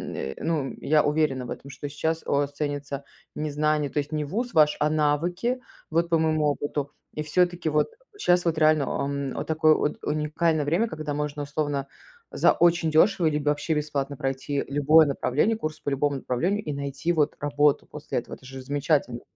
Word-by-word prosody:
э, 65 0 -4
ну 155 -5 -1
я 150 0 +3
уверена 145 -4 +1
в - - -9
этом, 140 - -7
что 140 +2 -7
сейчас 160 +3 -2
у - - -3
вас 140 0 +1
ценится 145 -1 -4 0.3
не 155 0 -2
знание, 150 0 +1
то - - -8
есть 145 +1 -4
не 150 -1 0
ВУЗ 220 - -3
ваш, 150 -2 +4
а 150 - +2
навыки, 165 - 0 0.3
вот 170 +1 +1
по 165 -1 +3
моему 155 -1 +2
опыту. 145 -1 -1 0.2
И 150 - -2
всё-таки 175 +2 +1
вот 150 - +2 0.3
щас 175 - +2
вот 165 -2 +1
реально, 155 -2 +4 0.2
ам, 140 -1 -3
а, - - -1
такое 155 0 +4
от 150 - -1
уникальное 155 +1 0
время, 170 +10 +2
когда 155 -6 -4
можно 150 0 -3
условно 145 -1 -2 0.4
за - - +4
очень 170 -1 +3
дешево 175 +3 +4
либо 150 -1 +1
вообще 150 +2 0
бесплатно 145 -2 -2
пройти 135 +1 -2
любое 150 +3 +5
направление, 145 - +1
курс 155 -6 -4
по - - -3
любому 140 +1 0
направлению 175 +12 -1
и 150 - -3
найти 140 +3 -2
вот 155 -3 +1
работу 145 0 +2
после - - -4
этого. - - -8
Это - - -19
же 135 +1 -8
замечательно. 140 -2 0
150 Hz, 190 wpm, -26 LUFS, 140-160 Hz, 0.4 s, любое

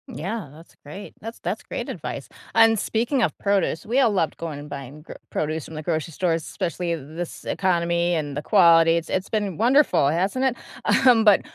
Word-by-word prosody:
Yeah, 185 - -5
that's 160 +3 -16
great. 170 +8 -9
That's 225 +2 -8
that's - - -3
great - - -5
advice, - - -6 0.3
and 225 0 +6
speaking 235 +6 0
of - - 0
produce, 200 -5 0
we 240 +5 +1
all 245 -5 +4
loved 180 -6 0
going 160 -4 -5
and 145 +1 -10
buying 140 +1 -8
gr - - -10 0.2
produce 155 0 -2
from 160 - -10
the 155 - -6
grocery 160 0 -2
stores, 165 0 0
especially 175 -2 -3
th 145 -5 -9
this 175 0 -6
economy 170 -2 +1
and 145 -3 -3
the 145 - -3
quality, 165 -2 +5
it's 165 - -4
it's 190 +1 -2
been 205 -6 -2
wonderful, 255 - +4
hasn't 190 - 0
it? 260 -2 +1 0.5
Um, 235 -3 +6
but 210 -3 +6
175 Hz, 195 wpm, -23 LUFS, 160-215 Hz, 0.5 s, and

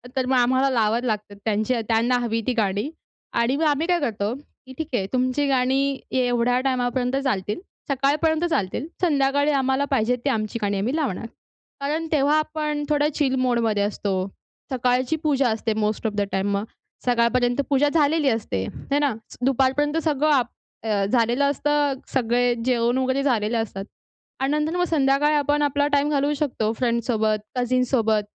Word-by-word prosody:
तर 260 - 0
मग 260 +1 +1
आम्हाला 260 +2 +3
लावावं 230 -2 +1
लागतात 210 -3 -3
त्यांचे 220 +3 0
त्यांना 235 +2 +2
हवी 230 -1 -1
ती 255 - +2
गाणी 205 +5 0 0.5
आणि 240 +3 +1
मग 320 - 0
आम्ही 300 +3 +1
काय 355 -1 +2
करतो, 215 -6 -2
की 265 -1 -15
ठीक 315 -2 -3
आहे, 200 -6 +1
तुमची 255 +3 +1
गाणी 270 +1 +1 0.2
एवढ्या 245 0 +2
टाईमापर्यंत 250 0 0
चालतील. 210 - -1 0.3
सकाळपर्यंत 300 +4 +1
चालतील, 205 - -1 0.2
संध्याकाळी 285 -2 +2
आम्हाला 265 0 +1
पाहिजे 250 -2 +2
ती - - +3
आमची 220 -2 -2
गाणी 205 -1 0
आम्ही 245 +9 -1
लावणार. 265 - -2 0.6
कारण 310 +3 -2
तेव्हा 295 0 +3
आपण 305 -1 -2
थोडं 295 0 +2
चिल 270 -3 +1
मोडमध्ये 230 -5 +1
असतो. 195 -2 -2 0.4
सकाळची 255 +3 +1
पूजा 275 -4 +2
असते, 220 0 -1
मोस्ट 215 +1 -1
ऑफ 215 - -3
द 205 - -1
टाईम 195 +1 0
मग 200 - -2 0.4
सकाळपर्यंत 245 +1 +2
पूजा 285 +1 +3
झालेली 300 -2 +3
असते, 220 - -1 0.3
हे 285 - +3
ना? 285 -4 +1 0.3
दुपारपर्यंत 270 +3 +2
सगळं 305 -1 +1
आप 220 -4 -2
झालेलं 240 +3 +2
असतं. 290 0 +1 0.2
सगळे 245 -1 +2
जेवण 240 -1 +2
वगैरे 260 +1 0
झालेलं 230 -4 +1
असतात 195 -3 -7 0.5
आणि 270 +2 0
नंतर 305 +3 -1
मग 355 - +2
संध्याकाळी 295 -2 +2
आपण 290 0 +1
आपला 290 0 +1
टाईम 285 0 +1
घालवू 285 0 +1
शकतो, 265 -7 -1
फ्रेंड्ससोबत, 230 -2 0 0.2
कझिनसोबत, 245 -3 +1
255 Hz, 160 wpm, -23 LUFS, 230-285 Hz, 0.6 s, आम्हाला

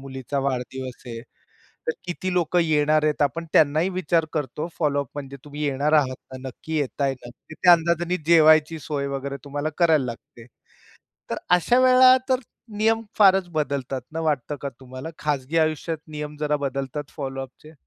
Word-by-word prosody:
मुलीचा 135 0 -5
वाढदिवस 130 0 -5
आहे, 115 -1 -6 0.7
तर 475 - +3
किती 185 +1 -3
लोकं 175 0 +2
येणार 155 -1 +2
आहेत, 150 -1 +1
आपण 165 +4 0
त्यांनाही 155 +4 +4
विचार 170 -3 +1
करतो. 150 +1 -3
फॉलोअप 145 -4 0
म्हणजे 140 -1 -7
तुम्ही 150 +1 -7
येणार 145 +2 0
आहात 135 -4 +3 0.2
ना, 130 - -7
नक्की 155 +5 -5
येताय 140 -1 -1
ना. 120 -2 -11 0.2
तर 160 - -7
त्या 180 -1 +8
अंदाजाने 170 +1 +2
जेवायची 155 -1 +5
सोय 140 -1 -3
वगैरे 140 0 -4
तुम्हाला 145 +2 -3
करायला 160 -6 +4
लागते. 115 -1 -9 0.8
तर - - -1
अशा 180 +8 +4
वेळा 255 0 +7
तर 260 -1 +2 0.4
नियम 225 +1 +2 0.2
फारच 190 -3 +5
बदलतात 140 -4 -2
ना, 165 - -3
वाटतं 150 -2 -1
का 140 - -3
तुम्हाला 130 +4 -8
खाजगी 150 +1 -1
आयुष्यात 155 0 0
नियम 150 -1 -6
जरा 150 -1 +1
बदलतात 140 +1 -4
फॉलोअपचे? 135 +2 -7
150 Hz, 160 wpm, -24 LUFS, 135-165 Hz, 0.8 s, त्या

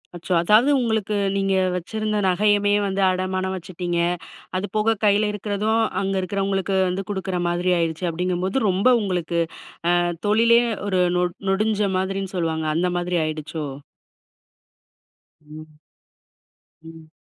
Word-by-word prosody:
அச்சோ, 175 +2 -3
அதாவது 215 +9 +4
உங்களுக்கு, 220 -3 -1 0.2
நீங்க 195 -1 +1 0.2
வச்சிருந்த 215 +4 -2
நகையுமே 205 +2 +3
வந்து 195 0 -1
அடமானம் 185 0 -1
வச்சுட்டீங்க. 175 -1 -4 0.6
அது 185 - -2
போக 220 +1 +2
கையில 210 +1 +3
இருக்கிறதும் 210 +2 -1 0.2
அங்க 195 0 -1
இருக்கிறவங்களுக்கு 195 +1 -1
வந்து 185 +2 -2
குடுக்குற 190 -2 -2
மாதிரி 175 +1 0
ஆயிடுச்சு. 165 +1 -1
அப்படிங்கும்போது. 180 +7 -1
ரொம்ப 190 +5 +1
உங்களுக்கு, 175 -4 -1 0.6
அ - - +3 0.3
தொழிலே 230 +2 +5 0.3
ஒரு 185 -2 +1 0.2
நொ 180 - +2 0.3
நொடுஞ்ச 210 +1 +1
மாதிரின்னு 195 +1 -3
சொல்லுவாங்க. 160 -2 -1
அந்த 180 +2 +1
மாதிரி 175 0 -1
ஆயிடுச்சோ? 155 0 -4 1.8
ம். 155 0 -13 1.0
ம். 160 -1 -13
190 Hz, 120 wpm, -22 LUFS, 175-205 Hz, 1.8 s, தொழிலே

